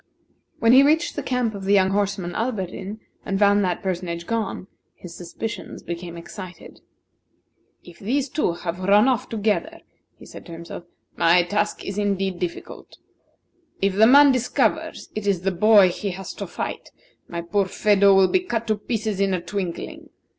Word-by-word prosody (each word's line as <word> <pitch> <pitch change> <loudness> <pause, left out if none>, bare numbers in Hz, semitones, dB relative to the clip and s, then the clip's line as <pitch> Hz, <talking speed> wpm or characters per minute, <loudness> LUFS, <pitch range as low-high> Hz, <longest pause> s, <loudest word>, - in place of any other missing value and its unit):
When 230 - +4
he 260 +2 +8
reached 315 +4 +2
the - - -2
camp 250 -3 -1
of 200 -1 -7
the 200 +1 +4
young 190 -1 +3
horseman, 195 -3 -1
Alberdin, 205 -2 -4 0.2
and 195 - -2
found 205 0 +4
that 180 -2 -2
personage 175 -2 -3
gone, 220 -4 -3 0.3
his 175 -2 -11
suspicions 220 +6 -7
became 170 0 -6
excited. 180 +1 -10 1.0
"If 175 -1 -15
these 260 +7 -1
two 260 - 0
have 170 0 -5
run 200 +5 +4
off 255 -4 0
together," 225 +9 -1 0.4
he - - -14
said - - -11
to 170 - -9
himself, 170 +1 -9 0.3
"my 170 +1 +5
task 205 +4 -2
is 195 +1 -4
indeed 195 -3 -1
difficult. 175 -2 -6 0.8
If 195 0 +1
the 215 +3 +5
man 285 +2 +8
discovers 250 -1 -1
it 215 -1 -4
is 190 -4 +1
the 195 +1 0
boy 200 +1 +6
he 200 +3 -4
has 190 +1 -7
to - - -6
fight, - - -5 0.4
my 170 -1 -5
poor 195 +4 0
Phedo 200 0 +4
will 190 -1 +6
be 370 - +2
cut 235 -11 -3
to 215 - +2
pieces 215 -2 -3
in 195 -1 +2
a - - -2
twinkling. 180 -1 -5
200 Hz, 170 wpm, -23 LUFS, 180-220 Hz, 1.0 s, he